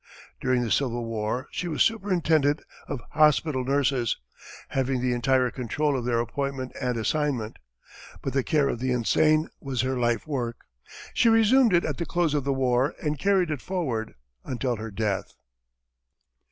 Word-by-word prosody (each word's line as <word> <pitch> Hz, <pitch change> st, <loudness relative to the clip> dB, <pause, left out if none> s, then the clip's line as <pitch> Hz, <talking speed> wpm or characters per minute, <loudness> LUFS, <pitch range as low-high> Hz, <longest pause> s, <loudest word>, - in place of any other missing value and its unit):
During 125 Hz, -1 st, +1 dB
the 115 Hz, -, -3 dB
Civil 120 Hz, -4 st, 0 dB
War, 115 Hz, +3 st, -2 dB
she 180 Hz, -, -3 dB
was 155 Hz, -3 st, +2 dB
superintendent 165 Hz, -9 st, +1 dB, 0.2 s
of 135 Hz, -6 st, -5 dB
hospital 150 Hz, -2 st, +3 dB
nurses, 130 Hz, -3 st, +1 dB, 0.5 s
having 135 Hz, -1 st, 0 dB
the 125 Hz, 0 st, 0 dB
entire 125 Hz, +1 st, +2 dB
control 140 Hz, +4 st, -1 dB
of 125 Hz, -3 st, -2 dB
their 120 Hz, -1 st, +1 dB
appointment 130 Hz, +2 st, -3 dB
and 125 Hz, -2 st, -1 dB
assignment. 125 Hz, -2 st, -1 dB, 0.7 s
But 135 Hz, -, -3 dB
the 135 Hz, -, +2 dB
care 145 Hz, +1 st, +2 dB
of 120 Hz, -, -2 dB
the 130 Hz, +1 st, -1 dB
insane 155 Hz, +6 st, +3 dB
was 135 Hz, -4 st, -2 dB
her 130 Hz, 0 st, -1 dB
life 120 Hz, -2 st, +1 dB
work. 120 Hz, -6 st, -3 dB, 0.6 s
She 235 Hz, -, +4 dB
resumed 225 Hz, +2 st, +5 dB
it 170 Hz, -, +2 dB
at 150 Hz, -, -2 dB
the 170 Hz, -, -3 dB
close 175 Hz, -3 st, +1 dB
of 145 Hz, -3 st, 0 dB
the 140 Hz, -, +1 dB
war, 130 Hz, +1 st, +1 dB
and 150 Hz, -2 st, -1 dB
carried 190 Hz, -1 st, +2 dB
it 145 Hz, -5 st, -3 dB
forward 135 Hz, -13 st, -3 dB, 0.3 s
until 125 Hz, -1 st, -2 dB
her 110 Hz, +1 st, -6 dB
death. 105 Hz, -2 st, -2 dB
135 Hz, 165 wpm, -26 LUFS, 120-155 Hz, 0.7 s, resumed